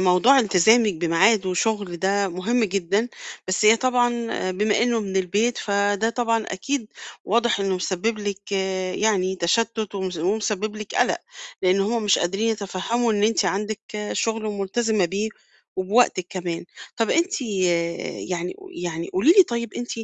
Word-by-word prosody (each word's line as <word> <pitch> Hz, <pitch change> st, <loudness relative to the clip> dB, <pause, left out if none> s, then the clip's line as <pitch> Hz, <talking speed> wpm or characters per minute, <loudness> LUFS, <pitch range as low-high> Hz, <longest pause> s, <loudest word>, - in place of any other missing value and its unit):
موضوع 185 Hz, +9 st, +5 dB
التزامِك 220 Hz, 0 st, +4 dB
بميعاد، 180 Hz, +5 st, +3 dB
وشُغل 190 Hz, 0 st, -1 dB
ده 195 Hz, +2 st, +1 dB
مهم 220 Hz, +7 st, 0 dB
جدًا، 200 Hz, +3 st, 0 dB, 0.4 s
بس 185 Hz, +3 st, 0 dB
هي 215 Hz, +2 st, +7 dB
طبعًا 245 Hz, 0 st, +2 dB, 0.4 s
بما 210 Hz, +4 st, +1 dB
إنه 235 Hz, -1 st, +1 dB
من 195 Hz, -2 st, -4 dB
البيت، 205 Hz, +6 st, +1 dB
فده 205 Hz, +1 st, 0 dB
طبعًا، 230 Hz, -2 st, 0 dB
أكيد، 230 Hz, +6 st, -3 dB, 0.4 s
واضح 235 Hz, 0 st, +1 dB
إنه 195 Hz, -1 st, 0 dB
مسبب 190 Hz, +5 st, -2 dB
لِك 205 Hz, -1 st, -4 dB
آآ، 190 Hz, -1 st, -1 dB
يعني 190 Hz, -3 st, +1 dB
تشتت، 220 Hz, +4 st, 0 dB
ومس 190 Hz, -2 st, -3 dB
ومسبب 210 Hz, +4 st, -1 dB
لِك 215 Hz, -1 st, -8 dB
قَلَق، -, -, +2 dB, 0.4 s
لأن 185 Hz, +1 st, +3 dB
هُم 225 Hz, +3 st, 0 dB
مش 205 Hz, -2 st, +3 dB
قادرين 195 Hz, +6 st, 0 dB
يتفهموا 220 Hz, +3 st, -1 dB
إن 205 Hz, -1 st, 0 dB
أنتِ 225 Hz, +1 st, +2 dB
عندِك 210 Hz, +1 st, -2 dB, 0.3 s
شغل 225 Hz, -1 st, -1 dB
ملتزمة 210 Hz, +1 st, 0 dB
بيه، 200 Hz, +5 st, -2 dB, 0.5 s
وبوقتِك 185 Hz, -1 st, +2 dB
كمان. 175 Hz, -3 st, -4 dB, 0.3 s
طَب 225 Hz, -2 st, 0 dB
أنتِ 340 Hz, -2 st, +1 dB
آآ، -, -, -4 dB, 0.8 s
يعني 175 Hz, 0 st, -2 dB
ق 390 Hz, -, -14 dB
يعني 170 Hz, -, -5 dB
قولي 230 Hz, -, +5 dB
لي 390 Hz, -, +10 dB
طيب، 235 Hz, -, -4 dB
أنتِ 240 Hz, 0 st, -5 dB
205 Hz, 155 wpm, -23 LUFS, 185-230 Hz, 0.8 s, لي